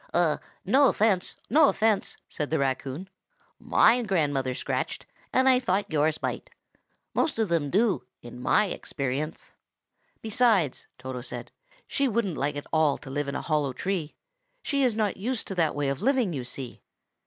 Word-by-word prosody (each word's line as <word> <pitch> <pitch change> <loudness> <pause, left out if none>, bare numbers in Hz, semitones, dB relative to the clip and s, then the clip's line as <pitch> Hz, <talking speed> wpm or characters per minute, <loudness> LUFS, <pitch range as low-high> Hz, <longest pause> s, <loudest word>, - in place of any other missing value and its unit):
"No 265 +7 +5
offence, 200 -4 +1
no 300 -1 +6
offence," 215 -2 +1
said 150 - -4
the 160 - +1
raccoon. 135 +5 -2 0.5
"My 245 +2 +4
grandmother 145 - 0
scratched, - - -3 0.3
and 260 +1 +3
I 255 -1 +6
thought 195 -5 -1
yours 155 +1 +2
might. - - -3 0.6
Most 305 - +1
of 220 -4 +1
them 165 -4 +1
do, 200 - +1
in 120 +1 -10
my 210 +10 +3
experience." 145 -4 -4 0.7
"Besides," 220 - +2
Toto 130 -1 -6
went - - -7
on, - - -49 0.3
"she 280 - 0
wouldn't 220 -7 0
like 145 +2 -1
at 145 - -5
all 155 -3 +3
to 135 - -10
live 145 +1 -2
in 140 - -3
a - - -3
hollow 150 -4 0
tree. 175 -1 -3 0.5
She 280 -1 0
is 245 -4 +2
not 215 -3 0
used 240 +4 -2
to - - -2
that 165 -4 +1
way 145 -1 0
of 135 0 -2
living, 255 -7 +2
you 130 -4 -4
see. 130 0 -7
170 Hz, 165 wpm, -27 LUFS, 140-220 Hz, 0.7 s, no